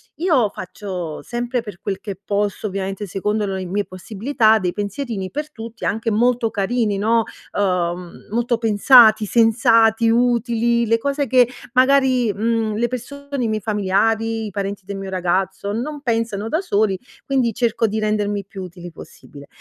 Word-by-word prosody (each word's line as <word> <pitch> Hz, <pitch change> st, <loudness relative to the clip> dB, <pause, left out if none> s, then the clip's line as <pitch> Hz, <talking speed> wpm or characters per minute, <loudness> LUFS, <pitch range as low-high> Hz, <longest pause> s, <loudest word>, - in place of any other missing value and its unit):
io 295 Hz, -, +2 dB
faccio 180 Hz, -4 st, -6 dB
sempre 240 Hz, +1 st, -3 dB
per 210 Hz, -6 st, -10 dB
quel 195 Hz, -2 st, -3 dB
che 200 Hz, -3 st, -6 dB
posso, 205 Hz, +1 st, -1 dB
ovviamente, 195 Hz, +1 st, -4 dB
secondo 210 Hz, +3 st, -1 dB
lo 195 Hz, -1 st, -3 dB
mie 200 Hz, +3 st, -2 dB
possibilità, 220 Hz, +5 st, +1 dB
dei 180 Hz, -3 st, -2 dB
pensierini 205 Hz, -1 st, -4 dB
per 300 Hz, +1 st, -5 dB
tutti, 230 Hz, -2 st, -8 dB
anche 225 Hz, +2 st, -1 dB
molto 235 Hz, +1 st, +2 dB
carini, 215 Hz, 0 st, 0 dB
no, 225 Hz, +3 st, +2 dB, 0.3 s
uhm, 180 Hz, -3 st, -2 dB
molto 235 Hz, +1 st, 0 dB
pensati, 220 Hz, 0 st, +6 dB
sensati, 225 Hz, 0 st, +4 dB
utili, 235 Hz, 0 st, +2 dB
le 230 Hz, +1 st, +3 dB
cose 280 Hz, +4 st, -1 dB
che, 250 Hz, 0 st, +5 dB, 0.3 s
magari, 255 Hz, -3 st, +4 dB
mhmm, 220 Hz, 0 st, 0 dB
le 235 Hz, +3 st, +1 dB
persone, 280 Hz, +2 st, -5 dB
i -, -, +1 dB
miei 215 Hz, -1 st, -1 dB
familiari, 220 Hz, +2 st, 0 dB
i 210 Hz, -, -6 dB
parenti 200 Hz, 0 st, -4 dB
del 200 Hz, 0 st, -5 dB
mio 195 Hz, 0 st, -6 dB
ragazzo 190 Hz, +2 st, -1 dB
non 285 Hz, +6 st, -4 dB
pensano 225 Hz, -5 st, -1 dB
da 320 Hz, +7 st, 0 dB
soli, 205 Hz, -, +1 dB, 0.3 s
quindi, 255 Hz, -4 st, +1 dB
cerco 230 Hz, 0 st, +1 dB
di 215 Hz, +1 st, -2 dB
rendermi 205 Hz, -2 st, -1 dB
più 195 Hz, -1 st, -8 dB
utili 175 Hz, -1 st, -9 dB
possibile. 145 Hz, -2 st, -13 dB
220 Hz, 155 wpm, -20 LUFS, 200-240 Hz, 0.3 s, pensati